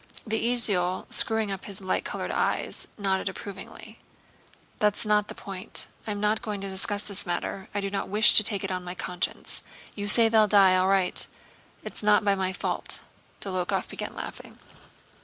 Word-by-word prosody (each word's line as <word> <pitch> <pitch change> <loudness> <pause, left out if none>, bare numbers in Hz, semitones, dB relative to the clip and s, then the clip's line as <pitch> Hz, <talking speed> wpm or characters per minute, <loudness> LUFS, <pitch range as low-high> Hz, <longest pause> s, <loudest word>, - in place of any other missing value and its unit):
The 220 0 -1
esaul, 185 -7 +2
screwing 220 -2 +3
up 195 -1 -5
his 200 0 -7
light 185 -1 -1
colored - - -4
eyes, - - -1
nodded 195 -1 0
approvingly. 195 0 -9 0.8
"That's 210 0 +2
not 210 -1 +2
the - - -8
point. 195 +1 -4 0.2
I'm 205 -1 -3
not 210 +1 +1
going 210 -2 -4
to 195 - -4
discuss 205 +2 -1
the 200 - -4
matter. 185 +2 -3
I 205 - 0
do 195 0 -3
not 200 - -3
wish 210 +2 +6
to - - +8
take 200 -2 -1
it 195 - -3
on 180 -1 -3
my 180 0 -6
conscience. 180 0 -4 0.3
You 205 -1 -4
say 225 +2 +8
they'll 220 -1 +4
die. 195 -2 +6
All 185 0 +3
wight. 190 -2 +2 0.6
Only - - -6
not 210 0 +3
by 200 - +4
my 190 -1 -1
fault!" 185 - -3 0.4
Dólokhov 185 -3 -2
began - - -6
laughing. - - -8
200 Hz, 175 wpm, -27 LUFS, 190-210 Hz, 0.8 s, to